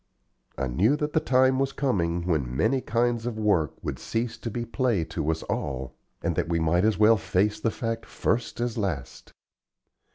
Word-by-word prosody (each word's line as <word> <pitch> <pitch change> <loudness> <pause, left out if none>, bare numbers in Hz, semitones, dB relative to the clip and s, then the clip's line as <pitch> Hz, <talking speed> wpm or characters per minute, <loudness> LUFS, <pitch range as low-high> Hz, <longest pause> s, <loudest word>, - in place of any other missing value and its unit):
I 70 - -1
knew 95 - +2
that 150 0 -2
the 155 - +4
time 130 -1 +3
was 135 0 0
coming 85 -11 0
when 70 -8 -1
many 135 - +2
kinds 120 0 0
of 115 -2 -3
work 100 -9 +1
would - - -4
cease 115 +1 -2
to 115 - -4
be 120 +2 -3
play 120 -6 0
to 80 -1 -3
us 80 0 -1
all, 65 -3 -3 0.3
and - - 0
that - - -1
we 85 -1 +1
might 85 +4 +2
as 110 -1 +2
well 110 +1 +6
face 105 +2 0
the 115 - +1
fact 115 0 -4
first 115 +1 -1
as 120 -1 -1
last. 85 -11 -4
110 Hz, 190 wpm, -26 LUFS, 85-120 Hz, 0.3 s, well